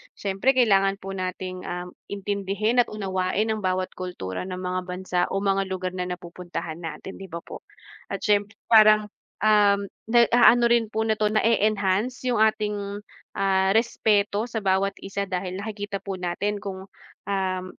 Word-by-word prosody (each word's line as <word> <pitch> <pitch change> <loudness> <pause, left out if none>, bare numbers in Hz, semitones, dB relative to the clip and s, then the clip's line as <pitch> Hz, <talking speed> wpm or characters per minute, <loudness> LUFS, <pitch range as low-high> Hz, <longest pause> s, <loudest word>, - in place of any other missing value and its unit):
siyempre 200 +7 +1
kailangan 195 -5 +4
po 195 - -6
nating, 185 -1 -5
um, 180 0 -5 0.2
intindihin 200 +3 -1
at 245 - +4
unawain 195 +1 -1
ang 220 - -2
bawat 185 0 0
kultura 180 - -5
ng 185 - -4
mga 185 0 -2
bansa 180 0 -3
o 195 +1 -1
mga 195 -1 +1
lugar 185 -1 -3
na 180 -1 -2
napupuntahan 175 -2 -6
natin, 165 +3 -7
'di 195 - -8
ba 170 -1 -7
po? - - -9 0.5
At - - -5
siyempre 205 0 +1 0.2
parang, 215 -1 +6 0.3
um, 205 -2 +4 0.2
na-aano 240 +1 +6
rin 235 -2 +3
po 220 0 0
na 220 -1 0
'to 215 - +3
na-e-enhance 215 +1 +1
yung 235 - +1
ating, 210 -2 0 0.3
ah, 190 -1 +2
respeto 220 -1 +2
sa 230 -2 -3
bawat 195 +1 +1
isa 200 0 -3
dahil 185 0 -3
nakikita 205 -1 -5
po 195 -1 -4
natin 200 +4 -2
kung, 190 -1 -6 0.4
um, 190 -2 -1
195 Hz, 155 wpm, -25 LUFS, 185-215 Hz, 0.5 s, parang